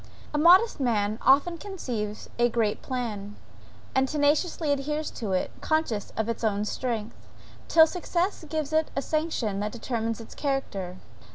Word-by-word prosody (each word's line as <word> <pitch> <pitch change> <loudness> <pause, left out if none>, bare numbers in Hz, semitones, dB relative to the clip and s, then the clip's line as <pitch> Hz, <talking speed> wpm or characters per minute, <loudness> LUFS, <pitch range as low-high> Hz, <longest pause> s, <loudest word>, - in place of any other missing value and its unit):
A - - +1
modest 360 +6 +6
man 215 -4 +1
often 290 +6 +4
conceives 240 - -4
a 240 0 +4
great 225 -3 0
plan, 215 -6 -4 0.6
and 265 0 +3
tenaciously 300 +1 +1
adheres 300 +2 -1
to 210 -5 -4
it, 185 - 0
conscious 315 -10 0
of 220 - +1
his 230 +1 -3
own 210 -1 +1
strength, 230 -1 -4 0.4
till 320 -1 +7
success 355 +2 -1
gives 310 -1 -2
it 315 0 +2
a 275 - 0
sanction 305 -11 -1
that 210 +1 -2
determines 230 -1 -2
its 225 - -10
character. 200 -11 -2
255 Hz, 150 wpm, -27 LUFS, 215-310 Hz, 0.6 s, till